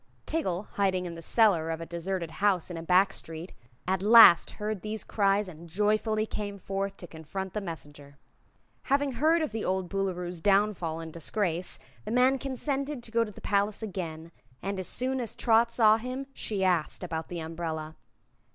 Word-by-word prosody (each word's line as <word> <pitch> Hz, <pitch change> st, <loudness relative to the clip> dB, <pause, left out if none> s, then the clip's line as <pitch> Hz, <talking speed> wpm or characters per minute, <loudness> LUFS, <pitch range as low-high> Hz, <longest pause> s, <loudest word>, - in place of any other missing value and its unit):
Tiggle, 205 Hz, -, -1 dB
hiding 190 Hz, -2 st, +1 dB
in 175 Hz, -, -5 dB
the 165 Hz, -, -9 dB
cellar 175 Hz, -4 st, +3 dB
of 165 Hz, 0 st, -2 dB
a 165 Hz, -, -6 dB
deserted 170 Hz, 0 st, -4 dB
house 190 Hz, -4 st, +2 dB
in 170 Hz, -, -5 dB
a -, -, -5 dB
back 185 Hz, +3 st, +3 dB
street, 165 Hz, +2 st, -7 dB, 0.3 s
at 190 Hz, 0 st, +1 dB
last 210 Hz, -5 st, +8 dB
heard 210 Hz, -2 st, -3 dB
these 215 Hz, 0 st, -3 dB
cries 200 Hz, -1 st, +1 dB
and 170 Hz, -1 st, -11 dB
joyfully 215 Hz, +3 st, +1 dB
came 205 Hz, -2 st, -5 dB
forth 195 Hz, +1 st, -4 dB
to -, -, -9 dB
confront 175 Hz, +4 st, -7 dB
the 210 Hz, -, -2 dB
messenger. 145 Hz, -5 st, -8 dB, 0.7 s
Having 280 Hz, 0 st, +1 dB
heard 315 Hz, +6 st, +2 dB
of 310 Hz, -, -3 dB
the 220 Hz, 0 st, -3 dB
old 185 Hz, -1 st, -1 dB
Boolooroo's 180 Hz, -3 st, -3 dB
downfall 195 Hz, -5 st, +1 dB
and 160 Hz, -1 st, -8 dB
disgrace, 175 Hz, +1 st, -1 dB, 0.3 s
the -, -, -7 dB
man 255 Hz, +3 st, +3 dB
consented 275 Hz, 0 st, -3 dB
to 225 Hz, -, -9 dB
go 230 Hz, 0 st, +3 dB
to 220 Hz, -, -6 dB
the -, -, -13 dB
palace 205 Hz, +2 st, 0 dB
again, 170 Hz, -5 st, -5 dB, 0.3 s
and 195 Hz, 0 st, -4 dB
as 185 Hz, -, -3 dB
soon 260 Hz, +1 st, 0 dB
as 230 Hz, -, -3 dB
Trot 230 Hz, 0 st, +3 dB
saw 220 Hz, -2 st, +5 dB
him 255 Hz, +4 st, -5 dB
she 205 Hz, -6 st, -2 dB
asked 180 Hz, -2 st, 0 dB
about 165 Hz, -2 st, -4 dB
the 175 Hz, -, -5 dB
umbrella. 160 Hz, -1 st, -5 dB
195 Hz, 180 wpm, -28 LUFS, 170-220 Hz, 0.7 s, last